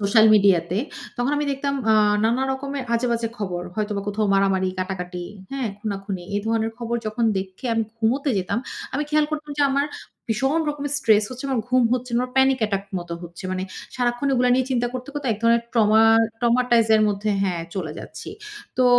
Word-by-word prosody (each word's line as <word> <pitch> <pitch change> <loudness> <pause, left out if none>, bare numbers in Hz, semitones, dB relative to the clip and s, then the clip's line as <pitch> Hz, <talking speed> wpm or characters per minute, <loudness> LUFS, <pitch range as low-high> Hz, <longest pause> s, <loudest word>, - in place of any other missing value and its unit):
Social 215 +2 +5
media 195 -4 +5
তে। 190 - 0 0.4
তখন 245 +3 0
আমি 295 - 0
দেখতাম 280 +1 -2 0.2
আ - - +5 0.3
নানা 240 +4 +2
রকমের 275 0 -4
আজেবাজে 235 -1 0
খবর। 180 -4 -3
হয়তোবা 210 -2 -2
কোথাও 210 +1 0
মারামারি, 195 -1 +2
কাটাকাটি, 180 -1 -4 0.3
হ্যাঁ? 265 -4 -2
খুনাখুনি। 195 -3 -4
এ - - +2
ধরনের 225 0 0
খবর 235 0 -2
যখন 225 +2 -1
দেখে 190 +5 -6
আমি 225 - +2 0.2
ঘুমুতে 255 +6 +1
যেতাম। 185 +5 -1 0.4
আমি 290 - 0
খেয়াল 300 0 +3
করতাম 305 -1 -4
যে - - +4
আমার 280 +1 +1 0.4
ভীষণ 270 +8 +1
রকমের 290 -1 -3
স্ট্রেস 215 -6 +4
হচ্ছে, 255 +1 -7
আমার 260 -4 +1
ঘুম 255 0 +4
হচ্ছে 250 0 -1
না, 235 - +2
আমার 250 0 -3
প্যানিক 265 0 +4
অ্যাটাক 200 -2 0
মত 175 -1 -9
হচ্ছে। 175 +2 -10
মানে 185 0 -2 0.3
সারাক্ষণ 245 +2 0
এগুলা 250 -1 +3
নিয়ে 260 0 +2
চিন্তা 245 -1 +1
করতে, 255 +2 -5
করতে 290 -2 -4
এক 210 - -5
ধরনের 235 0 +4
ট্রমার 225 0 +5 0.2
ট্রমাটাইজ 240 -1 +3
এর 215 - +3
মধ্যে 205 +1 -1
হ্যাঁ 180 -4 -1
চলে 170 -6 -3
যাচ্ছি। - - -8 0.5
তো 255 - +5
230 Hz, 190 wpm, -23 LUFS, 200-255 Hz, 0.5 s, Social